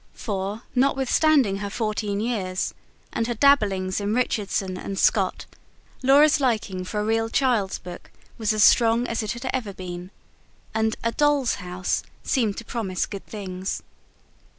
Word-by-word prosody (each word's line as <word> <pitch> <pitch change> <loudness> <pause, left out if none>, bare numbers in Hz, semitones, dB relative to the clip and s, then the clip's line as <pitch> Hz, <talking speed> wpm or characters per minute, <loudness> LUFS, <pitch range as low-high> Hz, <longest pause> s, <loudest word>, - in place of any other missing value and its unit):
For, 205 +1 -4
notwithstanding 270 -3 +3
her 200 0 -4
fourteen 215 -2 -2
years, 195 -6 -2 0.4
and 230 - 0
her 240 - -2
dabblings 205 -8 +3
in 205 +2 0
Richardson 200 -6 -1
and 195 +1 -5
Scott, - - +2 0.6
Laura's 285 +4 +5
liking 215 -8 0
for 210 +3 -3
a - - -1
real 225 +1 +1
child's 230 -7 +1
book 180 -1 -10 0.3
was 220 -1 +1
as 215 -1 +3
strong 230 +1 +5
as 230 -1 -2
it 215 +1 -2
had 240 +2 -6
ever 225 -6 -2
been; 180 -1 -7 0.6
and 220 0 +1
A 230 - +1
DOLL'S 290 -2 +2
HOUSE 180 0 -2 0.2
seemed 225 -7 0
to 230 - -6
promise 195 -7 -2
good 200 -2 -8
things. 190 -3 -5
215 Hz, 150 wpm, -24 LUFS, 195-245 Hz, 0.6 s, Laura's